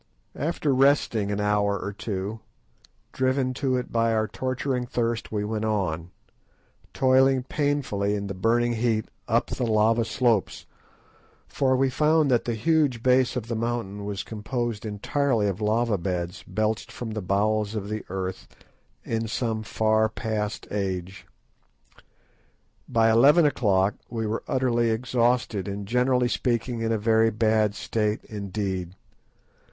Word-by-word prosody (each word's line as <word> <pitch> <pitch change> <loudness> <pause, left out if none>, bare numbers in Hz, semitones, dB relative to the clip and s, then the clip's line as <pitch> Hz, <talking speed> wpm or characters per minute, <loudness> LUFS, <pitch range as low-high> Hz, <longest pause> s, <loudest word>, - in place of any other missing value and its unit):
After 150 -1 0
resting 130 -6 +2
an 100 - -1
hour 105 -1 +1
or 100 - -5
two, 100 +1 -4 0.7
driven 130 0 +1
to 130 0 0
it 125 - -4
by 115 0 +2
our 110 0 +1
torturing 130 0 -2
thirst, 115 -2 -2
we 105 -1 -1
went 110 +1 -2
on, 90 -6 -1 0.8
toiling 130 0 +3
painfully 130 -9 -1
in 100 -1 -3
the 100 - -4
burning 120 +5 +1
heat 110 -2 0 0.2
up - - +1
the - - -2
lava 110 +1 +3
slopes, 115 -3 0 0.8
for 130 -1 +1
we 135 0 +2
found 150 +1 +3
that 120 - +2
the 120 - -1
huge 140 -1 +1
base 130 -1 +3
of 120 -3 -3
the 115 - -2
mountain 110 -3 -3
was 100 -1 -4
composed 115 0 -4
entirely 115 +2 0
of 100 +1 -3
lava 110 -1 +1
beds 90 +1 -3
belched 110 +3 -1
from 120 -2 -6
the 110 0 -3
bowels 105 +3 0
of 100 -2 -3
the 110 0 -4
earth 95 0 -4 0.6
in 115 0 -2
some 115 -1 -2
far 110 +1 +1
past 105 0 -3
age. 95 -2 -4 1.6
By 115 -2 +3
eleven 145 +9 +6
o'clock 100 -8 +2 0.2
we 115 -2 -3
were 110 +1 -2
utterly 120 -3 +1
exhausted, 115 -3 0
and, 100 0 -5
generally 125 +2 +2
speaking, 120 -1 -1
in 115 0 0
a 110 - +2
very 110 +1 +3
bad 110 -1 +1
state 105 -1 -1
indeed. 95 -3 -4
110 Hz, 140 wpm, -25 LUFS, 105-125 Hz, 1.6 s, eleven